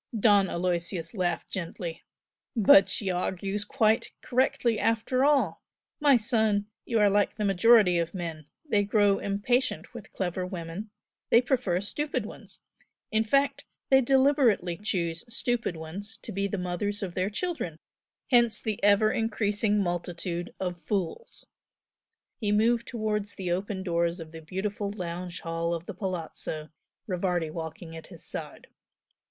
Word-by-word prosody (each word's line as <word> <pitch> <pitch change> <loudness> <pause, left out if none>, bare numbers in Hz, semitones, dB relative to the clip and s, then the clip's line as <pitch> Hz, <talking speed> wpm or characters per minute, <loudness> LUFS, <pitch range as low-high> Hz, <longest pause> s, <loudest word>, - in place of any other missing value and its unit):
Don 200 -3 +5
Aloysius 170 -1 -1
laughed 175 -5 -2
gently. 170 -2 -5 0.5
"But 195 -3 +7
she 195 -3 0
argues 190 +3 -2
quite 220 +2 +1
correctly 255 -3 +1
after 230 +3 +1
all! 270 - +2 0.4
My 290 -3 +6
son, 220 -3 +2 0.2
you 230 - 0
are 210 -1 +5
like 205 +1 +2
the 210 -1 -1
majority 195 -2 +5
of 170 +2 -2
men 165 -4 -5 0.2
they 205 -7 +3
grow 205 -1 +3
impatient 230 +6 0
with 235 -4 -10
clever 185 -1 -2
women, 180 +3 -6 0.4
they 235 - +7
prefer 240 -8 0
stupid 295 +9 -2
ones. - - -11 0.5
In 220 0 +3
fact 275 +5 +1 0.3
they 265 0 +7
deliberately 260 - +3
choose 170 -5 -2
stupid 235 -6 -1
ones 195 +8 -7
to - - -6
be 200 0 -1
the 200 - -3
mothers 185 +3 -2
of 180 -3 -4
their 185 +2 0
children 215 - -3 0.5
hence 240 -2 +5
the 215 -2 -3
ever 205 +1 +5
increasing 210 -1 0
multitude 175 -1 -3
of 180 -2 -3
fools!" 205 - -3 0.9
He 210 -3 0
moved 230 +3 +2
towards 210 -3 -2
the 180 -2 -3
open 190 +2 -2
doors 170 0 0
of 160 -1 -9
the 165 0 -9
beautiful 200 +5 -3
lounge 180 -3 -5
hall 165 0 -1
of 170 0 -7
the - - -6
Palazzo, 165 -5 -4 0.4
Rivardi 180 -4 -1
walking 160 0 -7
at 160 - -9
his - - -13
side. - - -7
200 Hz, 145 wpm, -28 LUFS, 175-220 Hz, 0.9 s, But